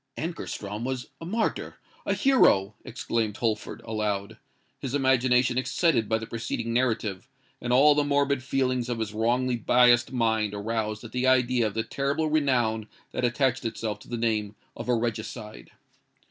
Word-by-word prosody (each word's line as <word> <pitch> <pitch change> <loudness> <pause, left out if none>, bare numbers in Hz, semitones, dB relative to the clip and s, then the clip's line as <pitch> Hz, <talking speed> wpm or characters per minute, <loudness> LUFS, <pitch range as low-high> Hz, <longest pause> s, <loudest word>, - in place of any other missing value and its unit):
"Ankarstrom 110 - -5
was 130 0 -4
a - - -6
martyr—a 220 +4 -3
hero!" 110 - +4
exclaimed 115 -3 -2
Holford, 110 -3 -2
aloud; 105 -2 -3 0.4
his 135 +1 -3
imagination 130 -2 +3
excited 130 - +1
by 110 - +2
the 110 - -6
preceding 115 0 -4
narrative, 115 -6 -1 0.3
and 120 - -3
all 140 +4 +6
the 145 0 +2
morbid 140 -1 +1
feelings 130 -1 -1
of 120 - -1
his 110 -2 -3
wrongly 120 +3 +1
biassed 120 +1 +4
mind 110 -4 0
aroused 110 +1 -3
at 115 - -9
the 125 +2 0
idea 125 -2 +3
of 105 - -6
the 115 - 0
terrible 140 +6 -1
renown 120 -8 +1 0.2
that - - -3
attached 130 +1 +1
itself 110 -2 -3
to - - -16
the 120 - -3
name 110 -3 -1 0.2
of 115 +2 -7
a 125 - +4
regicide. 110 - -4
120 Hz, 155 wpm, -26 LUFS, 110-130 Hz, 0.4 s, all